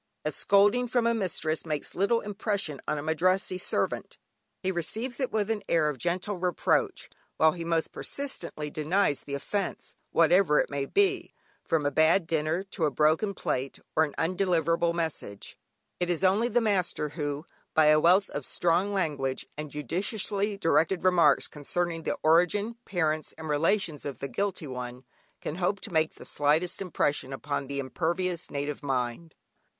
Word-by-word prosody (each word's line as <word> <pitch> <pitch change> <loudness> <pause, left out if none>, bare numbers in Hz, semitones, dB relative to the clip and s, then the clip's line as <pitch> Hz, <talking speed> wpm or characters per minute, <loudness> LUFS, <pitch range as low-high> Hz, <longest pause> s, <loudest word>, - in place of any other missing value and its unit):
A 155 - +1
scolding 205 - +3
from 240 0 +1
a 235 - +3
mistress 165 -7 -1
makes 150 -3 -4
little 200 +5 +2
impression 200 - -2
on 150 - 0
a 145 - -4
Madrassee 185 +4 +1
servant, - - -2 0.5
he 190 - +1
receives 220 - -3
it 260 - -1
with 215 0 0
an 215 -2 -1
air 160 -3 +3
of 140 -4 -5
gentle 180 - -1
reproach, 180 -1 0 0.3
while 160 0 +5
he 170 +1 -6
most 165 -1 0
persistently 170 - -4
denies 155 0 +1
the 140 - -6
offence, 195 +7 -3 0.2
whatever 165 -1 +4
it - - 0
may 140 -1 -2
be, 390 -3 +1 0.3
from 160 -3 0
a 145 - +2
bad 160 +4 +4
dinner, 160 +2 0
to 190 -4 -2
a - - +3
broken 155 - +2
plate 135 -6 -2 0.2
or 160 - +5
an 150 - -3
undelivered 170 -2 +1
message. 160 -11 -4 0.4
It 175 -1 0
is 175 0 0
only 200 +5 +4
the 240 0 +2
master, 185 -8 0
who, 145 0 -4 0.3
by 155 - +6
a 155 0 +6
wealth 185 +5 +5
of 145 - -4
strong 175 +8 +1
language, 145 -8 -1
and 150 0 -5
judiciously 200 - -2
directed 165 0 +2
remarks, 170 -6 +5
concerning 165 +3 -2
the - - -2
origin, 180 +8 +3
parents, 155 -4 -1
and 160 0 -7
relations 160 +1 +1
of 140 -4 -4
the 140 - -4
guilty 195 +1 -2
one, 125 -1 -6 0.4
can 155 - -4
hope 190 +2 0
to 210 - -6
make 160 0 +1
the - - -11
slightest 155 +6 +1
impression 145 -7 -1
upon 140 0 -3
the 140 0 -4
impervious 170 +5 -2
native 145 0 -3
mind. 135 +3 -3
165 Hz, 165 wpm, -28 LUFS, 150-195 Hz, 0.5 s, by